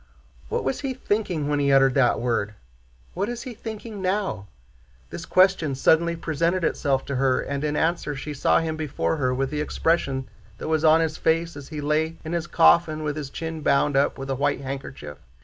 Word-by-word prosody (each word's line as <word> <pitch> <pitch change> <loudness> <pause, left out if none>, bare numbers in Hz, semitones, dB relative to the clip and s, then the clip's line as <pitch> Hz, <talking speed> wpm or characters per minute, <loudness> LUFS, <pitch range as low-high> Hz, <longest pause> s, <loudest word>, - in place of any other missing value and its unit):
"What - - -1
was 135 - -1
he 270 -2 -3
thinking 205 - -1
when 145 0 0
he 140 -1 +2
uttered 135 -1 +5
that 125 -3 +3
word? 115 -4 -1 0.6
What 200 +4 -2
is 240 -1 -5
he 255 - -7
thinking 220 -2 -7
now?" 185 - -1 0.6
This - - -7
question 185 -7 +3
suddenly 170 +5 +3
presented 165 +2 -1
itself 135 -4 0
to 140 - -3
her, 130 -1 +2
and 140 +1 -3
in 150 -1 -1
answer 160 -2 0
she 150 +2 -6
saw 145 - +2
him 160 -1 -2
before 155 +1 -1
her 130 -3 +1
with 135 +2 -1
the 150 0 -2
expression 140 -4 0 0.3
that - - -6
was 160 0 +1
on 160 +1 +6
his 160 -1 -1
face 165 0 0
as 145 -1 -9
he 150 -2 -5
lay 155 +2 0
in 160 - -4
his 170 0 -2
coffin 165 -2 +4
with 150 -1 -2
his 150 -3 -5
chin 160 +2 -5
bound 140 0 +2
up 140 +1 +2
with 135 0 -5
a - - 0
white 140 +1 0
handkerchief. 135 - -7
155 Hz, 200 wpm, -24 LUFS, 135-170 Hz, 0.6 s, on